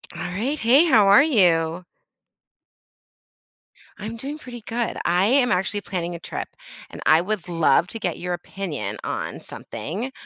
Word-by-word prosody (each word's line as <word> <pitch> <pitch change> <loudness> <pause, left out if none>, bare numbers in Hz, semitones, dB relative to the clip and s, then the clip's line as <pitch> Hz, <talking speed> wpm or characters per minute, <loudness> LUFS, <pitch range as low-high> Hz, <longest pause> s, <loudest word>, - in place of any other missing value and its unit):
All - - -6
right. 225 +12 -2
Hey, 265 +6 +5
how 225 -11 +5
are 200 +8 +7
you? 175 - +2 2.1
I'm 215 +2 -6
doing 280 +6 -6
pretty 245 -5 -10
good. 230 +1 -3
I 175 +2 +3
am 250 0 +3
actually 190 +3 0
planning 175 -3 -4
a - - -7
trip, - - -6 0.4
and - - -10
I 160 +2 +5
would 195 -1 -3
love 170 0 +2
to 225 - -7
get 175 -5 -2
your 180 0 -3
opinion 155 - -5
on - - -4
something. 175 - -6
195 Hz, 150 wpm, -23 LUFS, 175-235 Hz, 2.1 s, are